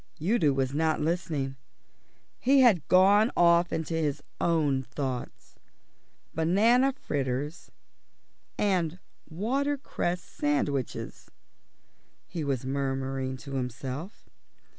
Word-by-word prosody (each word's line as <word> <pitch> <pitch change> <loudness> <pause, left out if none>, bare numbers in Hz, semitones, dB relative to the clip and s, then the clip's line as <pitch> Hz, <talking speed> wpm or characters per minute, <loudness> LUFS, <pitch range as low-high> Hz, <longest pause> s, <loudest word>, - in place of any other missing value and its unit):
Udo 170 -2 +2
was 135 0 -1
not 155 +1 +1
listening. 150 -4 -2 0.8
He 270 +2 +4
had 210 - +4
gone 200 +5 +5
off 170 0 +4
into 160 0 -2
his 155 -4 -1 0.2
own 150 -6 +2
thoughts. 130 -2 -6 0.8
"Banana 220 - +3
fritters 145 - -3 0.9
and 180 -5 +1 0.3
watercress 240 - -1
sandwiches," 145 -4 -2 1.0
he 170 -3 -5
was 135 -3 -2
murmuring 135 -1 -2
to 140 +2 -10
himself. 130 - -5
155 Hz, 90 wpm, -28 LUFS, 135-185 Hz, 1.0 s, gone